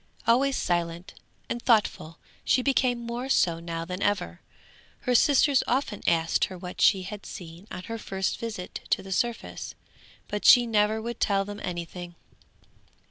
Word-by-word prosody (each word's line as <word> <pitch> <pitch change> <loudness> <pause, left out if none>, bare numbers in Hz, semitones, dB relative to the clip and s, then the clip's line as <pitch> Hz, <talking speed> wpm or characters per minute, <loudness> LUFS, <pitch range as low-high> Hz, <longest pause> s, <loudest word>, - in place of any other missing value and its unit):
Always 260 +4 +3
silent 170 0 -2 0.3
and 235 - -3
thoughtful, 210 -9 +1 0.3
she 255 - +2
became 255 -3 +2
more 240 +3 -4
so 170 -10 +2
now 165 0 -5
than 180 +2 -5
ever. 190 - -1 0.6
Her 250 - 0
sisters 275 +2 +5
often 245 -5 -1
asked 165 -1 +2
her 185 - -9
what 180 0 -7
she 190 -2 +5
had 205 +2 -7
seen 170 +2 -10
on 180 - -7
her 230 +2 -5
first 190 -2 -2
visit 220 -6 -6
to - - +1
the 195 - -9
surface, 235 +4 -2 0.5
but 210 - -4
she 245 -1 +8
never 215 -1 +2
would 235 +2 -5
tell 195 -2 +2
them 205 0 -7
anything. 175 0 -6
205 Hz, 155 wpm, -27 LUFS, 175-235 Hz, 0.6 s, she